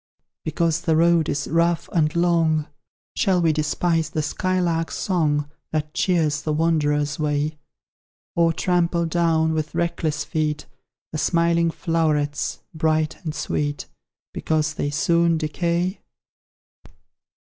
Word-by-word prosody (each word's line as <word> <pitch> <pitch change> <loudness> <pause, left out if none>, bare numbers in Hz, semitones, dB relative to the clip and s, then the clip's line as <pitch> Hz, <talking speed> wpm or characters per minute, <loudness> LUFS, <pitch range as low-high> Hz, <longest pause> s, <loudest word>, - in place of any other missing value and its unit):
Because 165 +1 0
the 165 -2 +1
road 165 -1 +3
is 145 - -2
rough 170 +1 +1
and 155 -2 +1
long, 165 -3 +2 0.5
Shall 185 -2 +2
we 165 -2 +3
despise 160 +1 0
the 155 -1 -2
skylark's 170 0 -1
song, 150 -6 0 0.2
That 155 -1 -2
cheers 155 -5 +1
the 155 - -2
wanderer's 150 -2 +1
way? 150 0 -1 0.8
Or 170 -1 +4
trample 170 0 +1
down, 160 -1 +2
with 155 -1 -3
reckless 160 -4 -1
feet, 150 -1 -2 0.5
The 155 - -3
smiling 170 +1 +2
flowerets, 155 -4 -1
bright 155 0 0
and 155 -2 -4
sweet, 145 0 -2 0.5
Because 155 -1 0
they 145 - -2
soon 170 +3 +2
decay? 170 +4 -1
160 Hz, 115 wpm, -23 LUFS, 150-170 Hz, 0.8 s, Or